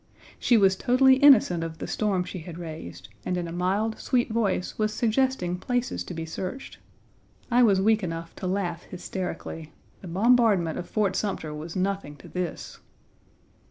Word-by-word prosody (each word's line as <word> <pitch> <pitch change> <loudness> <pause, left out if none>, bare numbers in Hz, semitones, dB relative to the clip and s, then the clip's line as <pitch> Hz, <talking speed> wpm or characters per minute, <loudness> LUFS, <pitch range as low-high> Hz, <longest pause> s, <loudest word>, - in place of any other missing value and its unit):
She 240 - +4
was 195 -2 +4
totally 260 +5 +4
innocent 245 - +6
of 160 -1 -6
the - - -5
storm 200 -4 0
she 185 +1 -7
had 165 0 -9
raised, 155 - -8
and 180 - -1
in 175 -1 -3
a - - -6
mild, 195 +6 -1
sweet 245 -3 0
voice 205 -5 0
was 215 0 +1
suggesting 225 -5 0
places 245 +3 -2
to 180 - -7
be 165 0 -4
searched. 185 +10 -6 0.7
I 245 +1 +5
was 200 -5 +5
weak 215 +2 +3
enough 165 -2 -5
to 185 - -4
laugh 180 -3 -2
hysterically. 175 -3 -6 0.3
The 190 - -9
bombardment 200 -3 +3
of 175 - -7
Fort 205 -4 0
Sumter 175 -7 -2
was 155 +2 -7
nothing 190 -5 -2
to - - -14
this. 180 -2 -5
190 Hz, 165 wpm, -26 LUFS, 170-220 Hz, 0.7 s, innocent